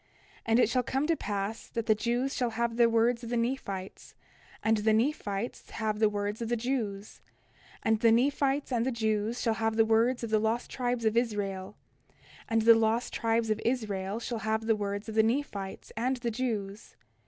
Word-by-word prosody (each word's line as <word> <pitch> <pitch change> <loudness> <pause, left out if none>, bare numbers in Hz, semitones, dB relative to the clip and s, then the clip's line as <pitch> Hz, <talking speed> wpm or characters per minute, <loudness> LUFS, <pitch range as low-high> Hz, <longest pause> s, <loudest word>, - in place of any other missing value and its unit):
29:13 - - -30
And 225 +1 +4
it 245 - +5
shall 255 +1 +2
come 270 +3 -1
to 330 +1 +2
pass 205 -3 -4
that 230 -1 -4
the 220 - +5
Jews 240 +5 -1
shall 245 -2 0
have 230 +1 -1
the 235 -1 +5
words 230 +1 +2
of 230 - -6
the 240 - 0
Nephites, 230 -6 -4 0.5
and 220 0 +3
the 215 +1 +2
Nephites 225 -3 -1
shall - - -13
have 215 -1 -1
the 215 -1 +4
words 205 +1 -3
of 230 - -3
the 240 - +2
Jews; 220 -5 -3 0.6
and 220 -1 +2
the 230 0 +5
Nephites 275 +3 +1
and 235 -2 +1
the 260 - 0
Jews 220 0 -1
shall 230 - +1
have 225 0 -1
the 225 0 +4
words 230 +3 +2
of 230 - -4
the 215 - +4
lost 220 +2 -1
tribes 245 -2 -1
of 220 0 +2
Israel; 205 -4 -2 0.7
and 225 -1 +2
the 230 +1 +9
lost 225 +1 +1
tribes 225 -1 +1
of 215 - -1
Israel 210 -4 -1
shall 235 -1 -4
have 220 +1 -1
the 225 -1 +3
words 205 0 -3
of 220 - -5
the 220 - +5
Nephites 220 -5 -2
and 255 +4 0
the 240 -1 -2
Jews. 215 -4 -4
225 Hz, 205 wpm, -29 LUFS, 215-240 Hz, 0.7 s, the